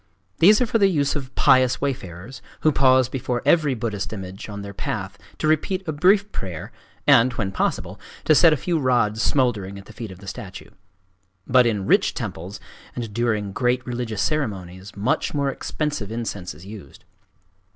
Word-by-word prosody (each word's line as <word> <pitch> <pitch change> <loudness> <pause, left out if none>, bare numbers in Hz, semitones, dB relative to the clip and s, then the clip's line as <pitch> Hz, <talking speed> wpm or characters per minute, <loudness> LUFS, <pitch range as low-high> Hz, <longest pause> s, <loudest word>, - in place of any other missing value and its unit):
These 210 +5 +7
are - - +4
for 225 0 0
the 200 - +5
use 145 -6 +1
of 135 -3 -6
pious 130 -1 +4
wayfarers, 125 -4 -5 0.2
who 155 - +4
pause 130 -2 +4
before 125 -2 -3
every 155 -6 +3
Buddhist 105 -3 -3
image 95 -1 -7
on 100 -1 -6
their 100 0 -8
path 100 0 -4 0.2
to - - -3
repeat 185 +5 0
a - - 0
brief 195 +7 +3
prayer 90 -5 -6 0.3
and, 130 -3 +6
when 105 -5 -2
possible, 95 0 -2 0.3
to 155 - +5
set 165 +2 +6
a 155 - +2
few 170 +4 -1
rods 120 -5 +1
smouldering 110 -9 0
at 100 - -11
the 110 - -13
feet 115 -1 -7
of 95 - -10
the 100 - -14
statue. 100 -2 -8 0.7
But 125 -1 +5
in 105 -4 -1
rich - - +3
temples, 90 +5 -6 0.4
and 115 -4 -5
during 110 -3 0
great 125 +4 0
religious 120 -4 -3
ceremonies, 95 - -3
much 115 +8 0
more 140 -1 +1
expensive 145 -8 -3
incense 100 -7 -4
is 80 +5 -14
used. 100 -1 -12
120 Hz, 175 wpm, -23 LUFS, 100-140 Hz, 0.7 s, These